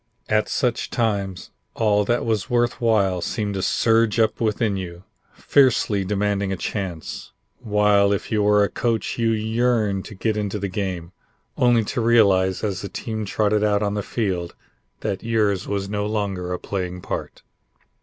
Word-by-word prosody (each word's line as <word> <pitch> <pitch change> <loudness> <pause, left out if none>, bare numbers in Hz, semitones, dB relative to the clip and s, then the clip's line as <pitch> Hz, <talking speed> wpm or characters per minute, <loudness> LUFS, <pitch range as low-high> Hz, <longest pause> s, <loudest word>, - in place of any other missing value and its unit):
At 105 0 +2
such 125 -4 0
times, 100 -6 -2 0.2
all 105 -2 +2
that 120 +3 0
was 110 -3 -1
worth 120 +1 +1
while 100 -6 +2
seemed 105 +2 -2
to 95 - -2
surge 115 +2 +2
up 110 0 +1
within 110 -1 +1
you, 90 -2 -6 0.3
fiercely 120 -7 +2
demanding 100 0 0
a 95 - -2
chance, 90 -5 -5 0.3
while 105 -1 +3
if 100 - -2
you 110 -2 +2
were 105 0 +4
a - - +2
coach 115 +1 -2
you 115 -1 +2
yearned 110 -2 +1
to 105 - -9
get 110 +2 -1
into 105 -1 -2
the 100 0 -2
game, 95 -4 -4 0.4
only 120 -2 +3
to 120 +4 -2
realize 100 -5 +3
as 100 -3 -2
the 100 - -6
team 110 +2 -4
trotted 105 +1 +1
out 105 0 +2
on 100 -1 0
the 105 - -1
field 95 -6 -3 0.5
that 95 - -2
yours 105 -4 0
was 100 -1 -2
no 105 0 -2
longer 100 -4 -2
a 90 - -1
playing 90 -2 -4
part. - - -5
105 Hz, 165 wpm, -22 LUFS, 95-110 Hz, 0.5 s, were